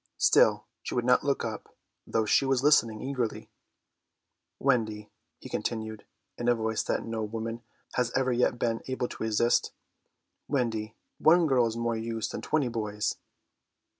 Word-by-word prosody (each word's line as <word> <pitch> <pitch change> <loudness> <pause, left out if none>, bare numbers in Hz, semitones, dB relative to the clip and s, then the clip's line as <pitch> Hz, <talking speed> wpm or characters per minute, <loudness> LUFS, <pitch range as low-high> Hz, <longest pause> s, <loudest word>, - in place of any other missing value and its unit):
Still - - +4 0.2
she - - -5
would 120 -1 0
not 125 0 +4
look 140 -1 0
up, - - -7 0.3
though 110 -1 +1
she 105 - +4
was 135 -1 +1
listening 115 -7 +4
eagerly. 130 -4 -3 1.1
"Wendy," 110 -6 0 0.3
he - - -10
continued, 110 -2 -4 0.3
in 120 - -2
a 120 - +5
voice 110 -1 -1
that - - -2
no 115 -1 -3
woman 115 +2 -4 0.3
has 125 -2 0
ever 130 -1 +1
yet 120 0 +2
been 115 -1 -1
able 130 -1 -1
to - - -10
resist, 110 +2 +2 0.8
"Wendy, 115 -5 -1 0.2
one 170 +2 +5
girl 130 -5 +3
is 115 0 -4
more 115 0 0
use 115 0 -3
than - - -5
twenty 150 -4 +1
boys." 105 -3 -2
115 Hz, 155 wpm, -28 LUFS, 110-125 Hz, 1.1 s, a